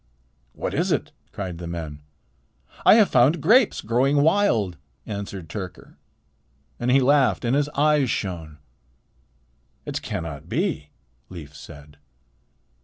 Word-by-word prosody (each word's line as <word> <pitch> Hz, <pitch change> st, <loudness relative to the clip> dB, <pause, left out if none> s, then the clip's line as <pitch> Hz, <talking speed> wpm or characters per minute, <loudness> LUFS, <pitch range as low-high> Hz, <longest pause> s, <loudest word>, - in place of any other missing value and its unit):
"What -, -, -4 dB
is -, -, 0 dB
it?" -, -, -1 dB, 0.2 s
cried 90 Hz, -4 st, -6 dB
the 85 Hz, -, -6 dB
men. 80 Hz, -4 st, -6 dB, 0.9 s
"I -, -, +9 dB
have 215 Hz, -3 st, +5 dB
found 135 Hz, +7 st, +4 dB
grapes 220 Hz, -, +4 dB
growing 135 Hz, +6 st, +2 dB
wild," 120 Hz, -, +2 dB, 0.3 s
answered 100 Hz, -4 st, -6 dB
Tyrker, 90 Hz, 0 st, -8 dB, 0.8 s
and 120 Hz, -, -1 dB
he 135 Hz, +2 st, +5 dB
laughed, 135 Hz, -1 st, +3 dB
and 120 Hz, +3 st, +2 dB
his 145 Hz, 0 st, +1 dB
eyes 150 Hz, -2 st, +3 dB
shone. 85 Hz, -8 st, -4 dB, 1.3 s
"It -, -, -4 dB
cannot 80 Hz, -1 st, -6 dB
be," 150 Hz, -, -2 dB, 0.4 s
Leif 75 Hz, -5 st, -10 dB
said. 75 Hz, +1 st, -13 dB
110 Hz, 120 wpm, -23 LUFS, -, 1.3 s, I